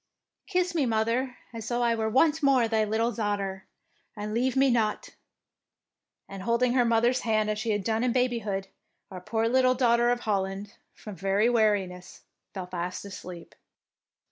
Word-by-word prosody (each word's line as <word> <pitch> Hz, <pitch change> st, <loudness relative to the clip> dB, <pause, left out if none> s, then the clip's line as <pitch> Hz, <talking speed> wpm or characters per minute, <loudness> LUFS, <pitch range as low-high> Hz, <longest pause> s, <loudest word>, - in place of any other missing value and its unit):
" -, -, -58 dB
Kiss 365 Hz, -2 st, 0 dB
me, 300 Hz, -6 st, +1 dB
mother, 230 Hz, +3 st, 0 dB, 0.2 s
as 225 Hz, -1 st, -7 dB
though 240 Hz, 0 st, 0 dB
I 235 Hz, -1 st, +3 dB
were 220 Hz, -1 st, -1 dB
once 310 Hz, +6 st, +3 dB
more 270 Hz, -5 st, +4 dB
thy 220 Hz, -1 st, +1 dB
little 220 Hz, +3 st, 0 dB
daughter, 200 Hz, -3 st, -3 dB, 0.5 s
and 210 Hz, +1 st, -5 dB
leave 250 Hz, +3 st, 0 dB
me 270 Hz, -1 st, +4 dB
not''; 220 Hz, -3 st, 0 dB, 1.2 s
and 195 Hz, -1 st, -8 dB
holding 235 Hz, +4 st, +1 dB
her 250 Hz, -1 st, +4 dB
mother's 235 Hz, +2 st, +2 dB
hand 215 Hz, -2 st, 0 dB
as 210 Hz, -, -3 dB
she 225 Hz, +1 st, -3 dB
had 205 Hz, -2 st, 0 dB
done 220 Hz, +3 st, 0 dB
in 250 Hz, -, +2 dB
babyhood, 230 Hz, -6 st, -1 dB, 0.4 s
our 185 Hz, -1 st, -8 dB
poor 225 Hz, +4 st, -1 dB
little 255 Hz, +1 st, +3 dB
Daughter 240 Hz, -1 st, +3 dB
of 245 Hz, 0 st, 0 dB
Holland, 195 Hz, -1 st, -2 dB, 0.2 s
from 210 Hz, -, -9 dB
very 195 Hz, +6 st, +1 dB
weariness, 200 Hz, -6 st, 0 dB, 0.3 s
fell 190 Hz, -2 st, -6 dB
fast 180 Hz, +1 st, -5 dB
asleep. 180 Hz, -3 st, -9 dB
225 Hz, 170 wpm, -27 LUFS, 205-245 Hz, 1.2 s, more